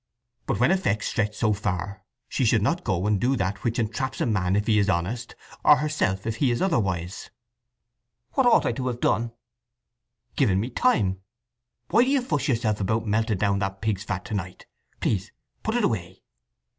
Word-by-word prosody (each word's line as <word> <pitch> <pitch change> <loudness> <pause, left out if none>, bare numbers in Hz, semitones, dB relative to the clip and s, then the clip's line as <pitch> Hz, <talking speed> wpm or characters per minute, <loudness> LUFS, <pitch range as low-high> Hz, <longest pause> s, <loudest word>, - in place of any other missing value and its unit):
But 120 -7 -1
when 125 +8 +4
effects 110 - 0
stretch 105 -1 -1
so 110 -2 +2
far 100 -1 -3 0.2
she - - -1
should 115 -3 +3
not 170 +9 0
go 95 -3 -1
and 105 -2 +1
do 130 +2 +2
that 95 -2 -2
which 115 0 -1
entraps 120 +3 -2
a - - +1
man 95 -5 +1
if 105 +1 +1
he 110 -2 +3
is 100 0 +2
honest, 100 +8 -2 0.3
or 150 - +8
herself 145 -11 -1
if 115 0 -2
he 140 - +2
is 120 - 0
otherwise." 95 - -1 1.0
"What 265 -2 +3
ought 235 - +5
I - - +2
to 130 +2 -3
have 120 -1 -2
done?" 115 -1 +1 1.0
"Given 100 -9 +3
me 120 +6 -3
time… 95 - +1 0.7
Why 230 +3 +6
do 255 - 0
you 275 -2 +2
fuss 150 - -1
yourself 110 -5 0
about 110 +4 0
melting 110 0 +1
down 100 0 +1
that 95 -1 -3
pig's 105 -2 -1
fat 90 -4 -4
to - - -6
night? 95 -2 -5 0.4
Please 95 -3 -1 0.3
put 220 - -2
it 240 - +1
away!" 95 - -2
110 Hz, 190 wpm, -25 LUFS, 95-125 Hz, 1.0 s, or